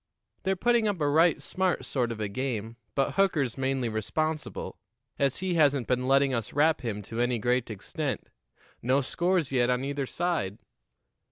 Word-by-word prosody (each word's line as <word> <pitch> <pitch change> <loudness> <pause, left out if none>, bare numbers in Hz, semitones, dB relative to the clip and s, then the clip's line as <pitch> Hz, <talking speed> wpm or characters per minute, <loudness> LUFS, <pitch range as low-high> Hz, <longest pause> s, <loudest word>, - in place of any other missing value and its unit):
They're 190 0 +1
putting 235 +3 +2
up 200 -4 -1
a 145 - +1
right 160 +2 +4
smart 185 -1 0
sort 125 -4 -1
of 115 - -5
a 105 - -1
game, 115 0 -3 0.2
but 135 - +2
Hooker's 155 - +2
mainly 135 -2 0
responsible, 150 +9 -3 0.4
as 140 -2 +2
he 185 - +1
hasn't 145 -6 +3
been 125 0 0
letting 135 0 +4
us 115 -3 -2
rap 155 +3 +3
him 105 -4 -3
to 115 +4 -3
any 120 0 +1
great 125 +2 0
extent. 105 -4 -4 0.5
No 130 +4 +2
scores 170 +2 0
yet 125 -2 +2
on 125 +1 +1
either 140 -1 -2
side." 155 - -1
135 Hz, 170 wpm, -28 LUFS, 120-160 Hz, 0.5 s, right